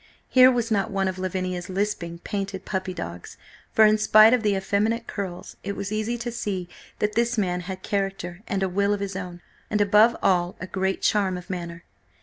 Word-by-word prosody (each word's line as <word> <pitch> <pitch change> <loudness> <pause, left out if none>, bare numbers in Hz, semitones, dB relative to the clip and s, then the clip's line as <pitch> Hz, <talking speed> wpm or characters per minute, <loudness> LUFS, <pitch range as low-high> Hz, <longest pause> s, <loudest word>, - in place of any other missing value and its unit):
Here 255 0 +7
was 235 -2 -1
not 200 -2 +1
one 195 -1 0
of 185 0 -3
Lavinia's 185 -1 -3
lisping, 185 -3 -2
painted 195 -2 -4
puppy 190 -2 -3
dogs, 90 - -7 0.3
for 220 - +6
in 215 0 +4
spite 215 +1 +7
of 250 - +3
the 210 -2 +1
effeminate 210 +4 0
curls, 190 -4 -6
it 200 +1 -4
was 200 +1 -4
easy 215 +3 -1
to 240 +1 -4
see 195 -6 -3 0.3
that 210 0 0
this 235 +1 +1
man 180 -4 0
had 185 +1 -7
character 195 -3 -3
and 195 -1 -1
a - - +2
will 200 +2 +1
of - - -7
his 200 -1 -4
own, 180 -2 -6 0.3
and, 210 - 0
above 210 +3 +5
all, 180 -1 +2
a - - -5
great 190 +1 -2
charm 195 -3 +2
of 180 +2 -8
manner. 170 -2 -6
195 Hz, 200 wpm, -25 LUFS, 185-215 Hz, 0.3 s, Here